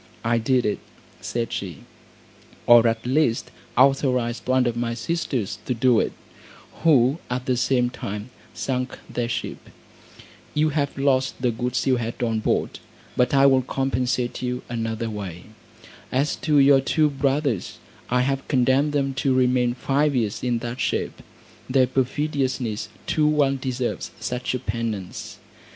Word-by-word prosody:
"I 115 0 +2
did 125 +2 +2
it," 105 - 0 0.4
said 115 -1 -3
she, 90 -7 -5 0.8
"or 120 -1 +7
at 115 0 -1
least 130 -2 +1 0.3
authorised 125 -3 +2
one 130 0 +3
of 120 -1 0
my 120 0 -2
sisters 120 - -2
to 125 - 0
do 120 -1 +4
it, - - 0 0.7
who 140 -2 +4
at 125 +1 -2
the 130 - +1
same 125 0 +1
time 105 +1 -6 0.2
sunk 130 -1 -2
their 120 -1 -2
ship. - - -5 0.9
You 155 +1 +3
have 145 -2 -1
lost 135 -1 +1
the 125 - +3
goods 125 +2 -2
you 130 -2 +3
had 120 +1 -4
on 115 -2 0
board, - - -1 0.4
but 125 +3 +2
I 135 0 +6
will 135 -1 +5
compensate 125 -2 -1
you 125 0 -3
another 115 -1 -2
way. 100 -5 -6 0.7
As 140 +4 +1
to 150 -2 +1
your 140 -1 +6
two 155 +3 +2
brothers, 140 - -1 0.3
I 125 +1 +2
have 135 +1 -1
condemned 135 +2 +2
them 135 -2 0
to 135 -2 +2
remain 125 -1 +2
five 140 +2 +1
years 110 -5 -1
in 120 -1 +1
that 120 +2 -5
shape. - - -2 0.5
Their 130 0 +4
perfidiousness 130 -4 -1 0.2
too 155 -1 +2
well 145 -3 +3
deserves 130 -2 -3
such 125 +1 -2
a - - -2
penance." 105 -5 -4
125 Hz, 150 wpm, -24 LUFS, 120-135 Hz, 0.9 s, or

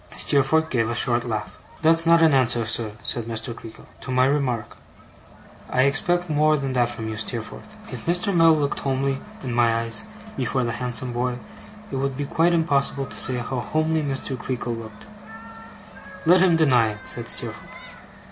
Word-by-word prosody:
Steerforth 150 +3 +2
gave 115 -3 +1
a 120 - -2
short 120 0 +3
laugh. 110 -3 -5 0.2
'That's 165 +1 +5
not 165 0 +6
an 160 -2 +5
answer, 120 -3 +2
sir,' 110 -1 0
said 120 -2 -2
Mr. 115 +1 -4
Creakle, 115 -1 -12
'to - - -10
my 130 0 +3
remark. 130 -6 -1 0.9
I 130 - +2
expect 175 +6 +1
more 155 0 +2
than 135 -2 -3
that 120 -2 +2
from 115 -2 -6
you, 110 -1 -5
Steerforth.' 120 - -6 0.2
If - - -8
Mr. 180 +3 +1
Mell 165 -2 +5
looked 145 -2 -1
homely, 135 0 -1 0.2
in 125 -3 -3
my 120 -1 +3
eyes, 115 -1 -1 0.3
before 130 -2 -1
the 120 - -1
handsome 125 0 -2
boy, 125 +1 -2 0.5
it 135 - -3
would 135 -1 -2
be 145 - -2
quite 165 +4 +2
impossible 140 -4 0
to - - -9
say 130 - -1
how 125 +1 -3
homely 155 +4 0
Mr. 135 -2 -3
Creakle 125 -1 -4
looked. 110 -2 -11 1.2
'Let 180 +2 +5
him 180 -3 +4
deny 125 -9 +3
it,' 105 0 -12
said - - +1
Steerforth. - - 0
130 Hz, 175 wpm, -23 LUFS, 120-155 Hz, 1.2 s, not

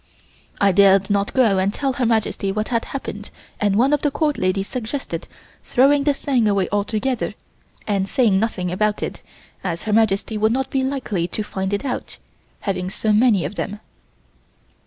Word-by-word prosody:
I 200 -1 +4
dared 195 +1 +5
not 200 0 +1
go 225 -7 +3
and 190 +1 +1
tell 270 +4 -1
Her 250 -2 0
Majesty 220 -3 0
what 215 +2 -2
had 230 -2 0
happened 210 -6 -6 0.3
and 205 -1 +2
one 260 +7 +3
of 295 - +2
the 295 - +2
Court 295 +1 0
ladies 195 +1 0
suggested 255 +3 -4 0.4
throwing 280 +2 +3
the 290 - +4
thing 260 -5 +1
away 200 -3 +2
altogether 215 +4 -1 0.5
and 195 -2 0
saying 220 -7 +3
nothing 190 -5 -1
about 210 +3 0
it - - -5 0.4
as 170 -3 -3
Her 215 - -1
Majesty 215 0 +2
would 220 +1 +3
not 265 +1 -2
be 265 -1 +1
likely 250 -10 -2
to 210 +5 -4
find 190 -2 -3
it 205 +6 -2
out, 255 - -4 0.4
having 185 -3 -2
so 215 +2 0
many 215 -4 +4
of - - -4
them. 205 0 -4
215 Hz, 180 wpm, -21 LUFS, 195-255 Hz, 0.5 s, dared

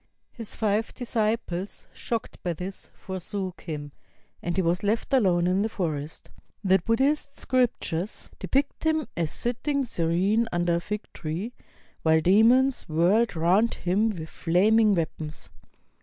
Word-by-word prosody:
His 230 -3 -7
five 215 0 0
disciples, 215 -6 -2
shocked 230 -2 -4
by 175 - -1
this, 185 +4 -7
forsook 190 0 -5
him; 145 -3 -6 0.5
and 175 0 -2
he 190 - +2
was 170 +2 +1
left 215 +6 -1
alone 185 -9 +4
in 185 +2 +2
the 220 - 0
forest. 155 -7 -4 0.3
The 190 -1 +4
Buddhist 275 - 0
scriptures 215 -7 -1
depict 275 +1 -1
him 315 -2 +1
as 165 -2 0
sitting 265 - -1
serene 195 +3 +1
under 175 -1 +1
a - - 0
fig 210 +4 -4
tree, 175 +9 -4 0.5
while 160 0 +4
demons 225 +7 +4
whirled 180 +8 +3
round 185 +8 +3
him 200 +5 +1
with 165 -7 -5
flaming 205 +5 +3
weapons. 160 -2 -4
195 Hz, 135 wpm, -26 LUFS, 170-230 Hz, 0.5 s, alone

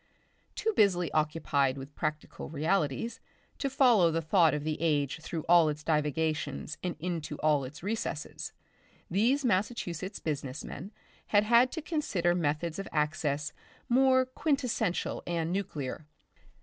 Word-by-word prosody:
Too 445 +1 0
busily 180 - +3
occupied 150 -3 +1
with 135 +2 -8
practical 155 -1 -4
realities 160 - 0 0.4
to 275 - 0
follow 245 -10 +5
the 165 0 0
thought 165 -1 +4
of 150 - -3
the 155 -1 -2
age 145 -3 +1
through 160 0 -5
all 170 -2 +6
its 150 0 -4
divagations 155 -1 -1
and 180 -2 -3
into 165 -3 -3
all 150 -2 +3
its 145 +6 -10
recesses, 205 -7 -3 0.6
these 245 +9 +2
Massachusetts 195 -3 -1
business 145 -3 -4
men 185 +8 -7 0.4
had 205 0 +4
had 235 +3 +5
to 320 - -4
consider 205 - 0
methods 165 +1 -1
of 195 - -4
access 150 -1 -1 0.3
more 260 +1 +4
quintessential 255 - -1
and 170 -1 -1
nuclear. 155 -7 -4
165 Hz, 135 wpm, -30 LUFS, 150-210 Hz, 0.6 s, all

